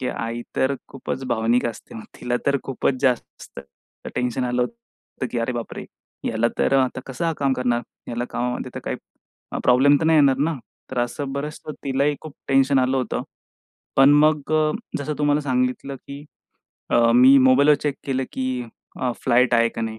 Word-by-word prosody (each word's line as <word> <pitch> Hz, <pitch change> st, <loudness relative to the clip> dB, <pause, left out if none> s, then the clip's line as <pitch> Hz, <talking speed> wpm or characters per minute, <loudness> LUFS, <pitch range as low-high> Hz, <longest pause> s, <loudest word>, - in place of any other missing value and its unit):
की 130 Hz, -, -2 dB
आई 115 Hz, 0 st, -4 dB
तर 130 Hz, +1 st, +2 dB
खूपच 135 Hz, 0 st, -5 dB
भावनिक 120 Hz, +1 st, +1 dB
असते 115 Hz, -1 st, -7 dB, 0.2 s
तिला 125 Hz, 0 st, 0 dB
तर 140 Hz, 0 st, +3 dB
खूपच 135 Hz, 0 st, 0 dB
जास्त 125 Hz, -3 st, -2 dB
तर 70 Hz, 0 st, -15 dB
टेन्शन 125 Hz, +1 st, -1 dB
आलं 125 Hz, 0 st, +1 dB
होतं, 235 Hz, -, -8 dB
की 120 Hz, -, -1 dB
अरे 115 Hz, +2 st, -1 dB
बापरे! 120 Hz, -2 st, -6 dB, 0.4 s
ह्याला 115 Hz, +1 st, +1 dB
तर -, -, +2 dB
आता 130 Hz, -1 st, 0 dB
कसं 165 Hz, +6 st, -2 dB
काम 140 Hz, -1 st, +1 dB
करणार? 125 Hz, -2 st, 0 dB, 0.3 s
ह्याला 120 Hz, +1 st, -3 dB
कामामध्ये 125 Hz, 0 st, -3 dB
तर -, -, -5 dB
काही -, -, -2 dB, 0.7 s
प्रॉब्लेम 135 Hz, +3 st, +5 dB
तर -, -, 0 dB
नाही 160 Hz, -1 st, +5 dB
येणार 140 Hz, -3 st, +5 dB
ना. 160 Hz, +4 st, +1 dB, 0.4 s
तर 130 Hz, -, -3 dB
असं 135 Hz, +3 st, -2 dB
बरंच 145 Hz, +2 st, -5 dB
तिलाही 140 Hz, 0 st, -1 dB
खूप 155 Hz, -3 st, -10 dB
टेन्शन 135 Hz, 0 st, +4 dB
आलं 130 Hz, +1 st, +2 dB
होतं. 130 Hz, -4 st, -2 dB, 0.7 s
पण 135 Hz, +1 st, +7 dB
मग 155 Hz, -1 st, +1 dB
अ, 155 Hz, -1 st, +3 dB, 0.3 s
जसं 150 Hz, +1 st, -3 dB
तुम्हाला 145 Hz, 0 st, +2 dB
सांगितलं, 130 Hz, 0 st, -1 dB
की 140 Hz, +2 st, -10 dB, 0.7 s
अ, -, -, +3 dB, 0.2 s
मी 130 Hz, +3 st, +8 dB
मोबाईलवर 135 Hz, +3 st, +5 dB
चेक 145 Hz, -2 st, 0 dB
केलं, 130 Hz, -1 st, 0 dB
की 130 Hz, -1 st, -2 dB, 0.4 s
अ, 125 Hz, -1 st, 0 dB
फ्लाइट 125 Hz, +1 st, +3 dB
आहे 115 Hz, 0 st, +4 dB
का 115 Hz, -, -5 dB
नाही. 110 Hz, -1 st, -4 dB
130 Hz, 175 wpm, -22 LUFS, 125-140 Hz, 0.7 s, मी